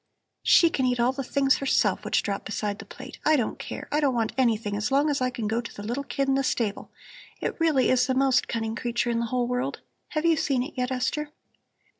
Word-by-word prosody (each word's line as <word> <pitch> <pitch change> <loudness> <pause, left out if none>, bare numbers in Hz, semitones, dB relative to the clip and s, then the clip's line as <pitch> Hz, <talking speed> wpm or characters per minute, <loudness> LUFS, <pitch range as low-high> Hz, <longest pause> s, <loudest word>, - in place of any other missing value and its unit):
"She 335 -1 +5
can 260 -4 +1
eat 245 -1 0
all 240 +2 +3
the 270 +1 -4
things 275 +1 +2
herself 275 - +1
which - - +1
drop 200 -1 -3
beside 205 0 -3
the 220 - -9
plate. 260 +6 -11
I 310 - +4
don't 245 -6 -1
care. - - -6
I 295 - +2
don't 280 -4 +2
want 225 -2 0
anything 225 -5 +1
as 210 +3 -2
long 285 +2 +3
as 280 - -1
I 255 - +2
can 235 -3 -4
go 225 +2 0
to 230 - -9
the 205 - -9
little 240 +6 -3
kid 275 0 -2
in 270 - +3
the 275 0 +1
stable; 220 -5 -1 0.5
it - - -3
really 315 -5 +3
is 255 -1 +3
the 260 - 0
most 265 -1 +3
cunning 225 -1 -2
creature 240 0 -1
in 230 - 0
the 235 - -1
whole 245 +1 0
world. 250 +3 -2 0.3
Have 310 0 -1
you 330 -1 +4
seen 270 -3 +1
it 285 - -8
yet, 250 -1 -1
Esther?" 295 +4 -1
255 Hz, 245 wpm, -26 LUFS, 230-275 Hz, 0.5 s, She